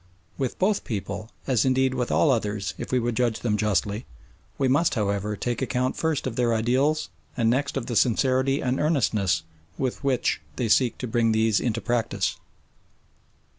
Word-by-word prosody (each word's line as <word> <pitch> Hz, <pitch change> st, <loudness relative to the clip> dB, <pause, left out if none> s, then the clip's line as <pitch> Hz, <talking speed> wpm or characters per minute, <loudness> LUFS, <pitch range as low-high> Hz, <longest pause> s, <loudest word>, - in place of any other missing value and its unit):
With 130 Hz, -3 st, -3 dB
both 195 Hz, +2 st, +1 dB
people, 110 Hz, 0 st, -4 dB, 0.2 s
as 125 Hz, -5 st, +2 dB
indeed 130 Hz, 0 st, +2 dB
with 125 Hz, -2 st, -2 dB
all 150 Hz, -, +4 dB
others 105 Hz, -5 st, -1 dB
if -, -, -5 dB
we 130 Hz, -, +3 dB
would 120 Hz, -1 st, 0 dB
judge 120 Hz, -2 st, 0 dB
them 110 Hz, -3 st, +1 dB
justly, 105 Hz, 0 st, 0 dB, 0.5 s
we 135 Hz, -, +2 dB
must, 145 Hz, +5 st, +2 dB
however, 105 Hz, -1 st, -1 dB
take 120 Hz, +3 st, -3 dB
account 125 Hz, 0 st, 0 dB
first 160 Hz, -3 st, -1 dB
of 130 Hz, -3 st, -3 dB
their 120 Hz, -2 st, +2 dB
ideals 130 Hz, +4 st, +1 dB, 0.3 s
and 115 Hz, -2 st, +3 dB
next 140 Hz, +2 st, 0 dB
of 130 Hz, -, -3 dB
the 120 Hz, -, -4 dB
sincerity 130 Hz, +3 st, +2 dB
and 130 Hz, +1 st, 0 dB
earnestness 105 Hz, -, +1 dB, 0.3 s
with 130 Hz, +1 st, -2 dB
which 130 Hz, -3 st, +1 dB
they 120 Hz, -3 st, -1 dB
seek 125 Hz, +2 st, +3 dB
to 125 Hz, -, -4 dB
bring 115 Hz, 0 st, +2 dB
these 110 Hz, -1 st, +3 dB
into 115 Hz, -2 st, -1 dB
practice. 115 Hz, -4 st, -1 dB
120 Hz, 170 wpm, -25 LUFS, 110-130 Hz, 0.5 s, all